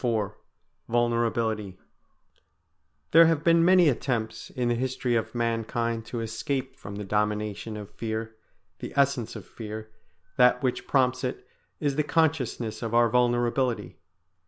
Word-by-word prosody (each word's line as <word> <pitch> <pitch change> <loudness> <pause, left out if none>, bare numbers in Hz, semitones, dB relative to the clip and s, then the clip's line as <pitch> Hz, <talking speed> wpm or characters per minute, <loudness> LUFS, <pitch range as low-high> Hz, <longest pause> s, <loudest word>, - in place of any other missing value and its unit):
IV 110 -4 0 0.6
VULNERABILITY 115 -4 0 1.3
There 165 +1 +8
have 160 -2 +1
been 165 0 +5
many 180 -1 +6
attempts 115 -5 -1
in 125 -1 -2
the - - +3
history 125 0 -1
of 115 +1 -2
mankind 115 -1 -1
to 120 - -4
escape 115 +5 -3
from 100 +1 -9
the 105 - -5
dominion 105 +1 -2
of 105 -2 -8
fear; 110 0 -4 0.4
the - - -7
essence 140 -4 +1
of - - -8
fear, 110 -1 -8 0.5
that 125 0 +5
which 130 -2 -1
prompts 130 -1 +2
it, 130 0 -4 0.3
is 145 -2 -1
the 150 - +3
consciousness 145 -8 0
of 115 -1 -2
our 120 0 +5
vulnerability. 120 +1 +1
120 Hz, 135 wpm, -27 LUFS, 110-130 Hz, 1.3 s, There